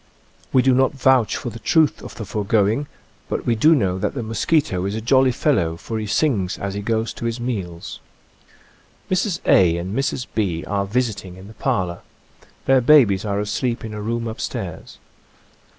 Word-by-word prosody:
We 130 Hz, -, +4 dB
do 130 Hz, 0 st, +4 dB
not 130 Hz, +2 st, +3 dB
vouch 130 Hz, -5 st, +3 dB
for 120 Hz, -, -5 dB
the 115 Hz, -, -9 dB
truth 155 Hz, +7 st, +2 dB
of -, -, -10 dB
the 110 Hz, -, -6 dB
foregoing, 105 Hz, +6 st, 0 dB, 0.4 s
but -, -, -3 dB
we 120 Hz, -, +2 dB
do 155 Hz, +9 st, +5 dB
know 95 Hz, -8 st, 0 dB
that 95 Hz, -, -2 dB
the 125 Hz, -, -3 dB
mosquito 110 Hz, -, 0 dB
is 100 Hz, +2 st, -2 dB
a -, -, -2 dB
jolly 130 Hz, +3 st, +3 dB
fellow, 105 Hz, -, 0 dB
for 110 Hz, +5 st, -5 dB
he 105 Hz, -, -4 dB
sings 105 Hz, -, 0 dB
as 100 Hz, -1 st, -4 dB
he 100 Hz, -, -4 dB
goes 110 Hz, +1 st, -1 dB
to -, -, -6 dB
his 115 Hz, +1 st, -2 dB
meals. 95 Hz, -9 st, -5 dB, 1.1 s
Mrs. 185 Hz, 0 st, 0 dB
A. 85 Hz, -3 st, +5 dB
and 90 Hz, +4 st, -4 dB
Mrs. 135 Hz, -2 st, -1 dB
B. 85 Hz, -7 st, -1 dB
are 100 Hz, +2 st, -1 dB
visiting 100 Hz, -5 st, -2 dB
in 95 Hz, +1 st, -12 dB
the 110 Hz, -, -12 dB
parlor. 90 Hz, -4 st, -1 dB, 0.7 s
Their 135 Hz, -1 st, +4 dB
babies 120 Hz, -8 st, +5 dB
are 100 Hz, -1 st, -1 dB
asleep 115 Hz, +3 st, -2 dB
in 110 Hz, -, -6 dB
a 105 Hz, -, -5 dB
room 115 Hz, +2 st, -2 dB
up 110 Hz, -, -6 dB
stairs. -, -, -6 dB
110 Hz, 185 wpm, -21 LUFS, 100-130 Hz, 1.1 s, do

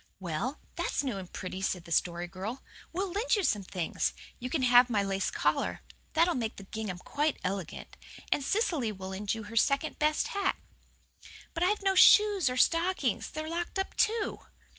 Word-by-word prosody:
"Well, 190 Hz, -, -3 dB, 0.2 s
that's -, -, -1 dB
new 255 Hz, -7 st, -2 dB
and 185 Hz, -2 st, -10 dB
pretty," 185 Hz, +1 st, -5 dB
said 180 Hz, -2 st, -2 dB
the 170 Hz, -, -12 dB
Story 175 Hz, +1 st, +1 dB
Girl. 195 Hz, +8 st, -6 dB, 0.3 s
"We'll 375 Hz, +2 st, -2 dB
lend 425 Hz, +7 st, +1 dB
you 405 Hz, -, 0 dB
some 210 Hz, -, +2 dB
things. 185 Hz, -3 st, -2 dB, 0.3 s
You 250 Hz, -, -4 dB
can 275 Hz, -1 st, 0 dB
have 245 Hz, 0 st, +6 dB
my 210 Hz, -4 st, +1 dB
lace 195 Hz, -1 st, -1 dB
collar. -, -, 0 dB, 0.3 s
That'll 335 Hz, +2 st, +4 dB
make 230 Hz, -3 st, -2 dB
the 195 Hz, -, -10 dB
gingham 205 Hz, -2 st, -5 dB
quite 295 Hz, +11 st, -1 dB
elegant. 185 Hz, -3 st, -4 dB, 0.4 s
And 280 Hz, -, +2 dB
Cecily 320 Hz, -, 0 dB
will 190 Hz, -2 st, -7 dB
lend 195 Hz, +2 st, -2 dB
you 220 Hz, -, -6 dB
her 220 Hz, +2 st, -9 dB
second 275 Hz, +6 st, +1 dB
best 305 Hz, 0 st, +1 dB
hat." 400 Hz, -1 st, 0 dB, 1.0 s
"But 330 Hz, -, -4 dB
I've 400 Hz, +3 st, +2 dB
no 385 Hz, -1 st, +3 dB
shoes 400 Hz, -4 st, +6 dB
or 250 Hz, -, -3 dB
stockings. 330 Hz, -, +2 dB
They're 310 Hz, 0 st, -5 dB
locked 340 Hz, +3 st, -3 dB
up 385 Hz, -, -2 dB
too." 455 Hz, -2 st, +1 dB
250 Hz, 185 wpm, -30 LUFS, -, 1.0 s, have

